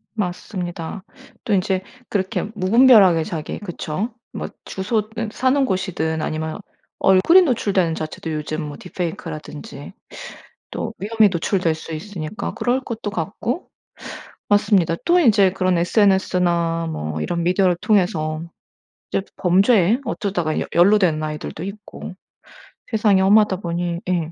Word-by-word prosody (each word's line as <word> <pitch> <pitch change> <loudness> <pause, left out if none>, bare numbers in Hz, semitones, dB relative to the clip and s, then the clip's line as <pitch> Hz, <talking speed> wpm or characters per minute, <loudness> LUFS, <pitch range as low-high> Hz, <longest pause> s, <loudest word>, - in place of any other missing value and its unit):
맞습니다. 180 -2 -4 0.4
또 225 - -1
인제 190 -1 +1 0.3
그렇게 190 -2 -1
무분별하게 200 -4 +6
자기 155 -1 -5
그쵸. 195 +3 -4 0.2
뭐 - - -4 0.2
주소든 215 +2 -2
사는 260 +3 +2
곳이든 170 -6 -2
아니면 155 +2 -3 0.4
얼굴이 195 - +6
노출되는 200 - +1
자체도 155 +1 -5
요즘 155 +1 -3
뭐 145 -1 -7
딥페이크라든지 160 -4 -6 0.8
또 225 - -4
위험에 215 +1 +3
노출될 175 -1 0
수 160 +1 -8
있으니까 180 +4 -5
그럴 250 +2 0
것도 225 -5 -5
같고. 210 - -3 0.8
맞습니다. 205 -5 +3
또 350 +1 +4
이제 205 - +5
그런 185 -2 +1
SNS나 175 -3 +2
뭐 75 - -4
이런 170 - -2
미디어를 180 0 +2
통해서 160 -6 +1 0.7
이제 - - 0
범죄에 195 +4 +3
어쩌다가 190 -9 -2
여 - - -3
연루된 175 -3 +4
아이들도 155 +1 -5
있고 200 +1 -8 0.8
세상이 210 -3 +3
험하다 205 +1 +5
보니 170 -1 -3
예 170 -3 -1
185 Hz, 295 characters per minute, -21 LUFS, 165-210 Hz, 0.8 s, 무분별하게